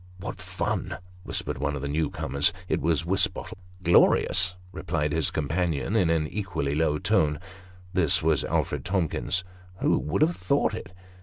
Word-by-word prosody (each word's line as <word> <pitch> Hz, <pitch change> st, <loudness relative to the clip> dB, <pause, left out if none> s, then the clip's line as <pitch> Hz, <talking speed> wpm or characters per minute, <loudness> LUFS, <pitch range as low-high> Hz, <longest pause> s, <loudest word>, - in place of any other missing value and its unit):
" -, -, -22 dB
What -, -, -6 dB
fun! -, -, -2 dB
" 90 Hz, 0 st, -22 dB
whispered -, -, -3 dB
one 75 Hz, 0 st, -1 dB
of 70 Hz, -, -5 dB
the -, -, -1 dB
new 75 Hz, +1 st, 0 dB
comers. 70 Hz, +5 st, +1 dB, 0.2 s
It -, -, 0 dB
was 80 Hz, +1 st, +1 dB
Wisbottle. 95 Hz, +1 st, 0 dB, 0.2 s
" 90 Hz, -, -23 dB
Glorious! 90 Hz, +1 st, +4 dB
" 90 Hz, -, -23 dB
replied 80 Hz, -5 st, -2 dB
his 80 Hz, -2 st, +2 dB
companion, 80 Hz, +3 st, -1 dB
in 95 Hz, -7 st, +3 dB
an 80 Hz, -2 st, +1 dB
equally 95 Hz, -7 st, -2 dB
low 75 Hz, 0 st, +1 dB
tone. 75 Hz, 0 st, +2 dB, 0.5 s
This 85 Hz, -7 st, +2 dB
was 80 Hz, -4 st, +3 dB
Alfred -, -, -1 dB
Tomkins. 90 Hz, 0 st, 0 dB, 0.2 s
" 90 Hz, 0 st, -22 dB
Who -, -, +3 dB
would 85 Hz, -, +1 dB
have 165 Hz, +2 st, +2 dB
thought 140 Hz, 0 st, +1 dB
it 95 Hz, -, -7 dB
85 Hz, 180 wpm, -26 LUFS, 75-90 Hz, 0.5 s, Glorious